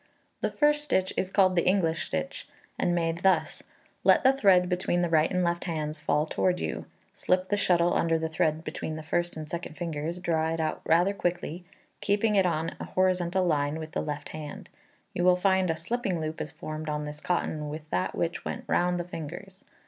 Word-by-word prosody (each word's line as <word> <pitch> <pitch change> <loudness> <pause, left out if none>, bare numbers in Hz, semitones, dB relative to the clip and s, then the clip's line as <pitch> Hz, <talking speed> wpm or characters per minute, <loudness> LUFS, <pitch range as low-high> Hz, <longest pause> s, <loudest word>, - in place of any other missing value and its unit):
The - - +1
first 295 0 +2
stitch 190 -10 0
is 185 - -1
called 190 -2 +3
the 170 - +2
English 170 -4 +2
stitch, 80 - -4 0.3
and 175 - +2
made 165 -1 0
thus: 190 +1 +2 0.4
Let - - +5
the 265 0 +6
thread 190 -8 +4
between 180 -1 0
the 170 - -1
right 155 -1 +4
and 180 -1 +1
left 170 0 0
hands 155 -3 -3
fall 150 0 +1
towards 180 +3 0
you; - - -4 0.3
slip 185 +1 0
the 205 - +2
shuttle 175 -3 +3
under 165 -1 +2
the 160 0 -2
thread 160 0 0
between 160 -1 -4
the 155 - -7
first 175 +2 -1
and 155 -1 -6
second 170 -1 -6
fingers; 165 0 -3
draw 160 -2 0
it - - -6
out 155 -1 -1
rather 175 +5 +4
quickly, 175 -2 -3 0.3
keeping 210 +2 +1
it 190 -2 +4
in 165 -1 -1
a - - -4
horizontal 185 0 +2
line 145 -2 +1
with 155 -1 -7
the - - -1
left 150 -1 -5
hand. 150 -2 -8 0.4
You 175 - -1
will 180 0 +6
find 190 -1 +2
a 165 - 0
slipping 190 +1 -2
loop 155 0 -4
is 150 - -4
formed 155 0 -6
on 150 0 -2
this 150 0 -7
cotton 155 -4 -1
with 155 +1 -7
that 90 - -1
which - - -2
went - - -4
round 175 0 +1
the - - -1
fingers. 180 +3 -8
170 Hz, 205 wpm, -28 LUFS, 155-185 Hz, 0.4 s, the